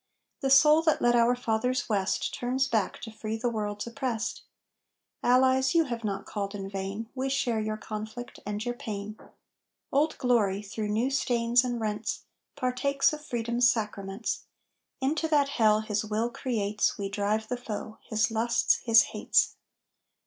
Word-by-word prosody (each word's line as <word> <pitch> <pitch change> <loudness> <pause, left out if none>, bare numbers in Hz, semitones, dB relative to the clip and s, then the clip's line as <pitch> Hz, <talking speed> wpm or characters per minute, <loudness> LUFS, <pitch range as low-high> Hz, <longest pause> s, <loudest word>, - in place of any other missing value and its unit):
The 270 - -1
soul 300 +3 +7
that 320 -1 +2
led 240 0 +3
our 240 +1 +4
fathers 245 +2 -1
west 200 -3 0
Turns 260 +2 0
back 220 -6 0
to 225 - -7
free 220 0 -4
the 240 +1 -1
world's 210 -2 -3
oppressed! 235 -1 -3 0.8
Allies, 260 +3 +3
you 330 - +6
have 235 -5 -5
not 200 -2 -3
called 200 -1 -4
in 195 -1 -5
vain; 195 +3 -4
We 265 0 -2
share 265 -5 0
your 215 0 -2
conflict 220 +3 -7
and 210 +2 -4
your 245 - -1
pain. 210 -3 -6 0.8
"Old 300 +3 +2
Glory," 210 -6 +1
through 210 +1 -4
new 230 +6 +1
stains 240 -2 +2
and 245 -2 -2
rents, 215 -1 -3 0.3
Partakes 275 +3 +1
of 300 0 -6
Freedom's 240 -2 +1
sacraments. 210 -1 -4 0.6
Into 305 +4 0
that 290 -3 +3
hell 215 -5 +3
his 210 -1 -1
will 220 +2 -1
creates 215 -5 -1
We 200 -2 -3
drive 210 +2 -1
the 250 - -2
foe 220 -2 -6
his 215 0 0
lusts, 230 +1 +2
his 230 -1 +5
hates. - - +2
230 Hz, 155 wpm, -28 LUFS, 215-255 Hz, 0.8 s, soul